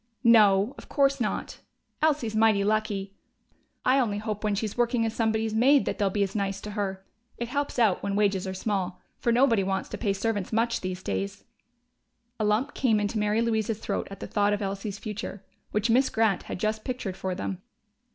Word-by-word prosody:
"No, 215 -1 +5
of - - -14
course 275 -2 +2
not. 215 - -2 0.4
Elsie's 290 -8 +1
mighty 215 -2 +4
lucky.... 205 -2 -1 0.7
I 260 +2 +4
only 215 -6 0
hope 215 0 -4
when 210 -1 +1
she's 210 0 -3
working 240 -1 +1
as 225 - -2
somebody's 220 -1 0
maid 265 +5 +5
that - - -3
they'll 200 -1 +2
be 200 +1 +1
as 195 -1 -3
nice 195 -2 -1
to 210 - -6
her. 195 -2 -3 0.3
It 235 -1 -4
helps 285 +1 -2
out, 220 -6 +3
when 200 0 -2
wages 200 -2 +1
are 190 - -3
small. 185 -2 -2 0.2
For 235 - +1
nobody 235 -3 +4
wants 190 0 -2
to - - -6
pay 200 -4 +1
servants 205 -1 -2
much 230 +1 +1
these 185 0 -4
days." 195 0 -3 1.0
A - - 0
lump 215 +7 +1
came 225 -5 +2
into 210 +1 -1
Mary 210 +2 +2
Louise's 220 -2 0
throat - - -3
at 195 -1 -9
the - - -5
thought 205 0 +1
of 205 - -2
Elsie's 195 +1 -4
future, 210 -2 -6 0.2
which 210 +2 +1
Miss 260 +3 +4
Grant 220 -4 +2
had - - -4
just 215 +1 -1
pictured 245 -8 -4
for 185 -1 -3
them. 190 0 -4
215 Hz, 200 wpm, -27 LUFS, 200-230 Hz, 1.0 s, No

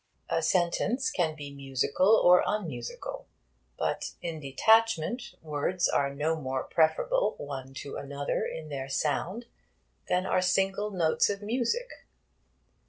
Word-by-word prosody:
A - - +2
sentence 190 - +1
can 165 - 0
be 145 -2 -8
musical 140 - +2
or 180 0 +7
unmusical. 160 - -4 0.5
But - - -2
in 165 -2 -5
detachment 220 - +2
words 155 +4 0
are 140 0 +1
no 150 +3 0
more 130 -4 -3
preferable - - +2
one 135 -2 -7
to 140 - -6
another 140 0 -2
in 155 -1 -5
their 135 -2 -5
sound 175 - -1 0.6
than 180 +1 +2
are 185 - +2
single 195 +3 +1
notes 170 -5 +2
of 200 0 -3
music. 255 - -1
165 Hz, 125 wpm, -29 LUFS, 140-205 Hz, 0.6 s, or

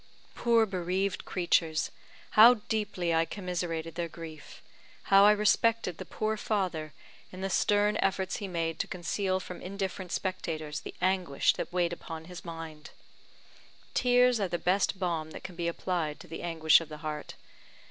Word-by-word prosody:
Poor 230 -2 +3
bereaved 190 0 -2
creatures, 165 -4 +1 0.4
how 230 +3 +9
deeply 205 -6 -2
I 165 0 +4
commiserated 170 -4 -4
their 170 0 -2
grief 160 -2 -10 0.5
how 195 +1 +9
I 210 - +8
respected 210 -2 +2
the - - -6
poor 215 0 -2
father, 180 -8 -1 0.4
in 185 - -8
the 195 0 -2
stern 205 +3 +3
efforts 190 -1 0
he 200 - -5
made 165 -3 -2
to - - -1
conceal 185 +2 -1
from 180 -1 -8
indifferent 190 -1 -4
spectators 155 -5 -3
the - - -9
anguish 185 -6 +2
that - - -5
weighed 175 -1 +1
upon 160 -1 -7
his 180 +1 -9
mind! 165 -3 -8 1.0
Tears 250 -1 +4
are 200 - +1
the 175 - -2
best 190 +3 +1
balm 170 -4 -2
that - - -9
can 190 -2 -8
be 170 0 -2
applied 170 -3 -2
to - - -12
the 165 - -7
anguish 160 -2 +4
of 165 - -9
the 150 - -7
heart. 150 -1 -5
180 Hz, 160 wpm, -30 LUFS, 165-200 Hz, 1.0 s, how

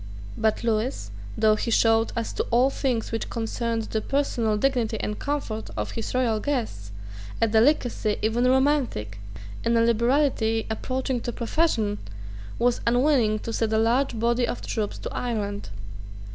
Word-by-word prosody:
But 220 +1 0
Lewis, 220 - -1 0.3
though 215 -1 +4
he 225 - -3
showed, 225 0 +3
as 230 -1 -2
to - - -1
all 250 +4 +4
things 250 -5 -1
which 225 - -3
concerned 230 0 -2
the 220 0 -2
personal 235 -6 0
dignity 235 -3 0
and 210 - -3
comfort 275 -7 -3
of - - -2
his 225 +2 -4
royal 235 -4 +2
guests, 215 - -3 0.5
a 225 - +3
delicacy 225 -1 +2
even 230 +3 +2
romantic, 255 - +1 0.4
and 230 0 +2
a - - +4
liberality 235 -1 +2
approaching 255 +2 -2
to 240 - -3
profusion, 230 -4 0 0.6
was 245 0 +1
unwilling 245 -3 +3
to 230 - -5
send 220 -1 0
a - - +3
large 235 +3 +2
body 235 +1 +2
of - - -4
troops 215 -3 -3
to - - -6
Ireland. 205 - -3
230 Hz, 150 wpm, -25 LUFS, 220-250 Hz, 0.6 s, though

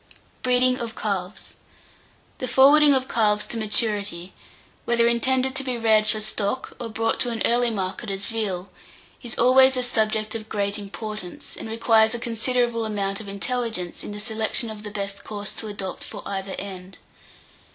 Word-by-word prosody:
BREEDING 255 0 +3
OF 230 -2 -5
CALVES. 200 -1 -4 0.9
The 255 - -3
forwarding 285 +3 +6
of 260 0 0
calves 210 -2 +2
to - - -6
maturity, 210 -5 -1 0.5
whether 235 0 +3
intended 260 +3 +2
to 275 - +1
be 255 -2 -2
reared 220 -2 +3
for 215 0 0
stock, 215 +3 -2
or 235 - -4
brought 225 +1 -1
to 245 - +2
an 230 -2 -2
early 240 0 +3
market 195 -3 -3
as 195 0 -3
veal, 200 -5 -3 0.5
is 240 -2 -4
always 260 +2 +6
a 250 - +1
subject 220 -2 0
of 220 -1 -6
great 200 0 -1
importance, 205 -2 -7
and - - -7
requires 225 0 +3
a - - -4
considerable 235 0 0
amount 200 -2 -2
of 210 - -11
intelligence 200 -3 -2
in - - -6
the 205 - -6
selection 220 +1 0
of 215 -1 -8
the 210 - -7
best 200 -1 -5
course, 205 -1 -4
to 220 - -7
adopt 200 -2 -5
for - - -9
either 195 -1 -4
end. 190 -1 -8
220 Hz, 170 wpm, -24 LUFS, 205-240 Hz, 0.9 s, forwarding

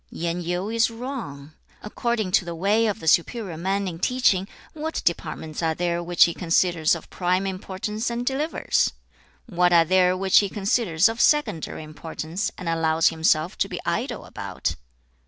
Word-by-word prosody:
Yen 170 +1 -3
Yu 175 +3 -2
is 230 +1 +2
wrong. 225 - -7 0.3
According 220 -2 -2
to 180 - +4
the 170 -1 -6
way 205 +6 +2
of 215 0 -2
the 160 - -8
superior 185 +2 +2
man 195 +4 -1
in 165 -2 -6
teaching, 195 -4 +2 0.3
what 315 0 -4
departments 160 -2 -2
are 160 -1 0
there 175 0 -1
which 175 0 +4
he 170 - +2
considers 170 -2 +2
of 165 - -9
prime 185 +1 0
importance, 195 +4 -4
and 235 +1 -3
delivers? 285 +5 0 0.5
what 180 -5 +2
are 170 -1 +6
there 185 +1 +3
which 190 0 +5
he 200 - 0
considers 195 -4 +2
of 225 +1 -2
secondary 295 - +1
importance, 160 +5 -5
and 180 - -7
allows 165 -1 +2
himself 160 +1 +1
to - - +1
be - - -5
idle - - -2
about? - - -4
185 Hz, 165 wpm, -24 LUFS, 165-215 Hz, 0.5 s, are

